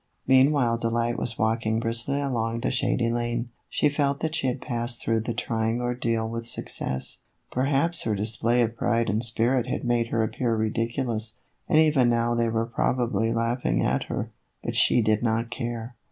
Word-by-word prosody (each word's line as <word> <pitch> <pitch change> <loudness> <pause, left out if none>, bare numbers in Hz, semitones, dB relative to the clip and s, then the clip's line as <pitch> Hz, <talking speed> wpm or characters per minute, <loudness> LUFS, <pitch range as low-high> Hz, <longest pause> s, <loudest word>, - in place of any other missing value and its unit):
Meanwhile 130 -3 +4
Delight 115 +1 0
was 115 -2 -2
walking 110 0 +1
briskly 115 +4 0
along 115 -4 -1
the - - 0
shady 120 -2 +1
lane. 120 0 -2 0.2
She - - +2
felt 140 -1 0
that 160 -1 -1
she 135 - 0
had 125 +1 -1
passed 120 -1 -3
through 115 0 0
the 115 +2 -3
trying 110 +1 -1
ordeal 120 -2 -1
with 115 +1 -5
success; 65 - -3 0.3
perhaps 140 +6 +2
her 110 -2 0
display 115 +4 +1
of 115 0 -2
pride 115 0 +1
and 110 +3 0
spirit 120 +2 +1
had - - -3
made 120 -1 +1
her 115 -1 0
appear 115 +1 -1
ridiculous, 115 +1 -1 0.3
and 160 - +4
even 150 -6 +5
now 120 0 +2
they 115 -1 +1
were 115 0 0
probably 115 -2 0
laughing 115 - 0
at - - 0
her; - - -4 0.3
but - - -3
she 120 - +4
did 110 0 +2
not 115 0 0
care. 120 -1 -4
115 Hz, 175 wpm, -26 LUFS, 115-125 Hz, 0.3 s, even